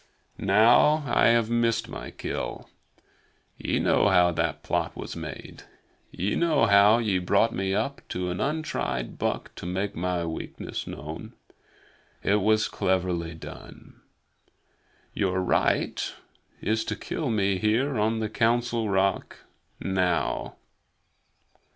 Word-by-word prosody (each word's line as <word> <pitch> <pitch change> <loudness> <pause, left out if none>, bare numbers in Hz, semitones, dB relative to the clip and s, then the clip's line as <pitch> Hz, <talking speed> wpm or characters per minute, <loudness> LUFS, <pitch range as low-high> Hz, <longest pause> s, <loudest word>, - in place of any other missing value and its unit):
Now 120 +8 +5
I 125 - +3
have 115 -1 +3
missed 115 -1 +1
my - - -7
kill. - - -5 0.9
Ye - - -1
know - - +3
how 90 -2 +5
that 80 -2 -2
plot - - -1
was - - -6
made. - - -8 0.5
Ye 95 +4 -2
know 160 -8 +3
how 100 +1 +6
ye 105 -6 +1
brought 100 +5 +2
me 95 0 -1
up 125 +7 -2
to 90 0 -2
an 90 - -4
untried 135 - -2
buck - - -2
to - - -6
make 95 +3 -2
my 90 0 -1
weakness 80 -1 -6
known. 75 +3 -7 0.9
It 105 +1 +2
was 110 +2 +3
cleverly 90 -4 -1
done. 80 - -12 1.1
Your 95 -2 0
right 90 - +1 0.5
is 110 +1 0
to 110 - -2
kill 150 +5 -4
me 100 -4 +1
here 115 +5 +1
on 110 +1 +1
the 110 - 0
Council 115 0 +1
Rock, 95 0 0 0.4
now. 95 -2 -1
100 Hz, 125 wpm, -26 LUFS, 90-115 Hz, 1.1 s, how